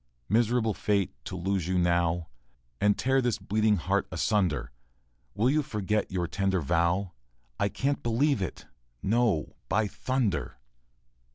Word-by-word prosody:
Miserable 115 +1 +2
fate, 100 -1 0
to - - -5
lose 95 -1 -1
you 95 0 +1
now, 85 -1 +1 0.5
And 105 0 +3
tear 135 +1 +2
this 120 -4 0
bleeding 110 +1 +2
heart 80 -9 0
asunder! 80 - 0 0.6
Will 110 +4 +2
you 150 +4 +3
forget 105 -5 -1
your 90 -2 0
tender 95 +2 0
vow? 85 +5 +1 0.5
I 100 - +2
can't 140 +6 -1
believe 120 +1 +1
it 95 - -4 0.4
no, 110 -6 +1 0.2
by 110 +1 +2
thunder! 100 - -1
100 Hz, 130 wpm, -28 LUFS, 85-115 Hz, 0.6 s, And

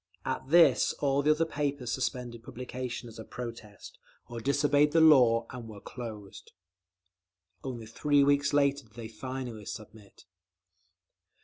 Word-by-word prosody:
At 130 0 -3
this 160 -5 +5
all 140 -1 0
the 145 - +1
other 155 +2 +3
papers 145 -5 -3
suspended 125 -2 -3
publication 125 0 -6
as 115 -1 -11
a - - -6
protest, 115 -3 -9 0.3
or 120 -1 -7
disobeyed 145 +3 +2
the 165 - +5
law 125 -8 +6
and 125 -3 -8
were 105 -2 -10
closed…. 110 -4 -9 1.1
Only 120 -4 -6
three 145 +5 +2
weeks 140 0 +2
later 140 -1 +2
did 110 - -26
they 115 -2 -7
finally 120 -1 -7
submit. 105 -3 -11
125 Hz, 135 wpm, -29 LUFS, 115-140 Hz, 1.1 s, law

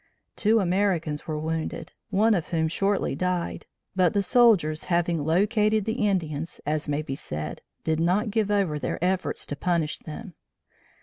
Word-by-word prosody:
Two 220 +1 +3
Americans 180 -5 0
were 155 -1 -2
wounded, 160 +1 -3 0.2
one 215 +3 +3
of 175 -6 0
whom 160 -2 0
shortly 195 +5 0
died; 180 -1 -2 0.3
but 180 -3 +3
the 200 - +3
soldiers 190 -9 +4
having 170 -3 +1
"located" 210 +5 +2
the 220 -1 0
Indians, 165 -5 -2
as 150 0 -1
may 145 +1 0
be 135 - -4
said, 75 - -5 0.2
did 160 0 0
not 190 +6 +1
give 215 -1 +1
over 195 -8 +1
their - - -2
efforts 185 0 -1
to 145 - -4
punish 160 0 0
them. 180 +5 -8
175 Hz, 160 wpm, -26 LUFS, 155-205 Hz, 0.3 s, soldiers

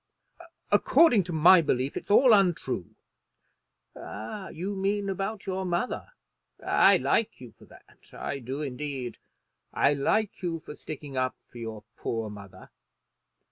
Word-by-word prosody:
"According 240 - +5
to 180 - -6
my 170 +3 +7
belief, 135 -3 -1
it's - - -6
all 240 +3 +6
untrue." 175 - +1 1.0
"You 180 - -6
mean 200 +1 -1
about 195 +2 -4
your 190 -1 -2
mother. 180 - -3 0.5
I - - +5
like 225 - 0
you 125 -3 -11
for - - -19
that; - - -19
I 140 - -5
do, 135 +4 -5
indeed. 135 -2 -5 0.5
I 145 - +3
like 200 +11 0
you 170 -3 -2
for 150 - -10
sticking 145 -3 -8
up 130 0 0 0.2
for 120 - -11
your 110 -2 -7
poor 115 -2 -3
mother. 100 -2 -12
160 Hz, 135 wpm, -27 LUFS, 130-195 Hz, 1.0 s, my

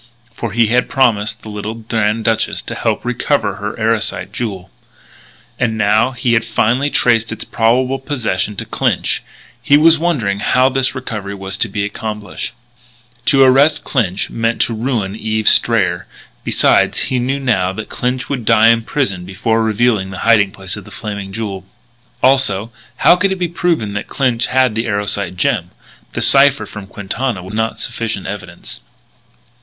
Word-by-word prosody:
For 115 -1 -5
he 115 +2 +3
had 120 +3 +1
promised 115 -6 +1
the 110 - -8
little 105 +1 -5
Grand 110 -1 -1
Duchess 115 -1 0
to - - -6
help - - -2
recover - - 0
her - - -5
Erosite - - -1
jewel; 95 -6 -5 0.9
and 110 -3 0
now 110 +3 +3
that 125 -2 -12
he 120 -3 +2
had 115 0 +3
finally 115 +4 +1
traced 115 -4 +2
its 115 - -5
probable 125 +4 +1
possession 110 -8 -2
to - - -5
Clinch, - - 0 0.4
he 145 - +5
was 160 +1 +5
wondering 125 - 0
how 130 +5 +3
this 135 0 0
recovery 105 -6 -5
was 95 0 -3
to 115 - +1
be 100 +1 -2
accomplished. 105 0 -5 0.7
To 135 -1 +5
arrest 140 +3 +4
Clinch 105 -8 -1
meant 115 0 0
ruin 115 -4 -2
to 110 - -9
Eve 110 -1 -2
Strayer. 95 -7 +2 0.4
Besides - - +2
he 130 - -1
knew 135 +3 -1
now 100 -9 +1
that 105 +3 -7
Clinch 125 +1 -2
would 135 -4 -3
die 110 +1 +5
in 115 0 +4
prison 115 -7 -2
before 105 +5 -1
revealing 110 -3 +1
the 95 -1 -6
hiding 110 -4 +5
place 95 -1 -5
of - - -9
the - - -14
Flaming 100 -2 -6
Jewel. 100 -3 -5 0.6
Also, 120 -5 +2 0.3
how - - +8
could 195 +2 +1
it - - 0
be 180 -2 -1
proven 165 -11 -1
that 100 - -4
Clinch 125 -4 0
had 130 -2 +2
the 115 +2 -2
Erosite 100 -3 -1
gem? - - 0 0.4
The - - -2
cipher 135 -4 +5
from 100 -1 -9
Quintana 105 +2 -3
was 95 +3 -9
not 110 +1 -1
sufficient 110 -4 -3
evidence. 95 -3 -8
115 Hz, 170 wpm, -16 LUFS, 100-130 Hz, 0.9 s, how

